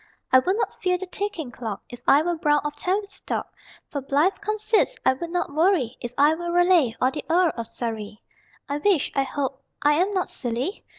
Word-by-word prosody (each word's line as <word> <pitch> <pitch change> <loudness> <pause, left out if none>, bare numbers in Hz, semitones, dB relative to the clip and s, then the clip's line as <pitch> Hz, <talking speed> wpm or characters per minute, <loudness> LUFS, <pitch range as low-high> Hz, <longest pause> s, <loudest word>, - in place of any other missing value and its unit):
I 260 - +8
would 370 +10 0
not - - -1
fear 365 -1 +2
the 380 - -5
ticking 365 -8 -4
clock 220 -4 -6
If 245 - -11
I 285 +3 +6
were 350 +1 0
Browne 295 -2 +2
of 295 0 -3
Tavistock. 395 +6 -3 0.3
For 285 - -4
blithe 290 +8 +1
conceits 430 +3 +1
I - - +5
would 335 +6 -6
not 350 -4 -2
worry 310 - +2
If 240 - -5
I 290 +2 +5
were 345 +1 -4
Raleigh, 350 -9 +4
or 255 - +3
the 295 - -5
Earl 345 0 +4
of 230 -1 -4
Surrey. 220 -3 -5 0.5
I 285 +1 -2
wish 370 -2 +2
(I 275 - +2
hope 270 0 -3 0.2
I 295 +1 +5
am 385 +3 +1
not 375 -2 0
silly?) 245 - -3
305 Hz, 200 wpm, -24 LUFS, 260-365 Hz, 0.5 s, I